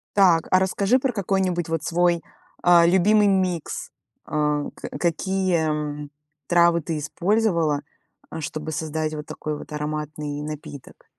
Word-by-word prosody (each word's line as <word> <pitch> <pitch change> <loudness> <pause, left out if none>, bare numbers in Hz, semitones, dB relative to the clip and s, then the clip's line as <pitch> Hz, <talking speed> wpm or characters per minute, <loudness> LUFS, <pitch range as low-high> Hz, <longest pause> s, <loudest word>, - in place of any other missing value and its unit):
Так, 175 -5 +5
а 185 - +6
расскажи 200 +6 +2
про 255 -2 -1
какой-нибудь 185 -4 0
вот 165 -1 -1
свой, 175 0 +2 0.4
а, 175 -1 +6
любимый 205 +4 +4
микс. 185 -4 -1 0.3
А, 150 -1 0
ка - - -7
какие, 185 +1 +1
м, 150 -1 -3 0.4
травы 170 -1 +4
ты 160 0 -3
использовала, 170 -2 +1 0.5
э, 160 - -5
чтобы 155 +1 -5
создать 155 0 -2
вот 150 -1 -6
такой 150 -1 -4
вот - - -11
ароматный 150 -1 -4
напиток? 150 -2 -9
165 Hz, 135 wpm, -23 LUFS, 150-185 Hz, 0.5 s, а